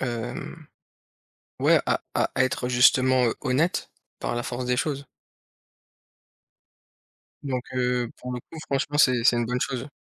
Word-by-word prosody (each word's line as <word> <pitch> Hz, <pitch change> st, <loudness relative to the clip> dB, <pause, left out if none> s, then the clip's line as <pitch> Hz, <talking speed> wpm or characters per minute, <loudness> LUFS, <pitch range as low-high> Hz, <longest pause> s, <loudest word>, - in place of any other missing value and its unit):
Hem, 120 Hz, -2 st, -5 dB, 0.9 s
ouais, -, -, +5 dB
à -, -, +1 dB
à -, -, +1 dB
être, 130 Hz, -1 st, +1 dB
heu, -, -, -2 dB
justement, 130 Hz, +1 st, +5 dB
heu, 115 Hz, -, -1 dB
honnête. 150 Hz, +6 st, 0 dB, 0.3 s
Par -, -, -2 dB
la 120 Hz, -, -2 dB
force 125 Hz, +1 st, -4 dB
des 125 Hz, 0 st, +1 dB
choses. 140 Hz, 0 st, -2 dB, 2.4 s
Donc 130 Hz, -3 st, -2 dB
heu, 125 Hz, -2 st, 0 dB
pour 125 Hz, 0 st, -7 dB
le 125 Hz, -, -3 dB
coup, 160 Hz, -, -13 dB
franchement, 140 Hz, +2 st, -1 dB
c'est 125 Hz, -4 st, +4 dB
c'est 120 Hz, -, +5 dB
une 120 Hz, -1 st, 0 dB
bonne 125 Hz, +1 st, -1 dB
chose. 130 Hz, -1 st, -2 dB
125 Hz, 150 wpm, -25 LUFS, 125-130 Hz, 2.4 s, ouais